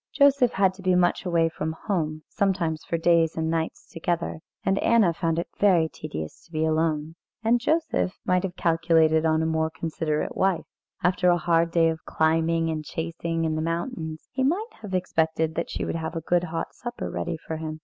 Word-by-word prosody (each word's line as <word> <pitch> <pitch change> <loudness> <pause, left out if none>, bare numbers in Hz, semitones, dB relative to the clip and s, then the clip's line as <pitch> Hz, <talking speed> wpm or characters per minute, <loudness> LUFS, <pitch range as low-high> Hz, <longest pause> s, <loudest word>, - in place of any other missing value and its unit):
Joseph 280 -4 +5
had 190 -1 +3
to 190 - -13
be 185 -1 +2
much 180 +1 +2
away 165 -2 +3
from 160 -1 -3
home, 155 -6 -1
sometimes 175 -6 0
for 165 - -2
days 165 -1 +3
and 160 0 0
nights 165 -1 -2
together, 170 -1 -2 0.3
and 195 +1 +2
Anna 220 -7 +4
found 165 -1 -1
it 170 - -1
very 180 -6 +4
tedious 80 - -7
to - - -24
be 155 -1 0
alone. 155 -1 0 0.3
And 235 +2 +3
Joseph 315 - 0
might 180 0 +3
have 185 -2 -4
calculated 165 -2 +3
on 160 0 +2
a - - 0
more 160 0 +1
considerate 160 -1 -2
wife. 190 -3 +1 0.4
After 180 +1 +3
a 175 - +4
hard 165 0 +2
day 165 -1 +3
of 160 0 -2
climbing 165 +1 +1
and 155 -1 -3
chasing 165 +1 -3
in 160 - 0
the 155 - -1
mountains, 165 -1 -3
he 260 - -1
might 370 - +1
have 200 -4 -4
expected 160 -3 0
that 170 - -3
she - - -3
would - - -2
have 160 +1 -4
a 165 - -2
good 175 +2 +1
hot 165 -1 -4
supper 240 0 -5
ready 170 -1 -3
for 160 0 -6
him. 155 0 -5
165 Hz, 200 wpm, -25 LUFS, 160-180 Hz, 0.4 s, Joseph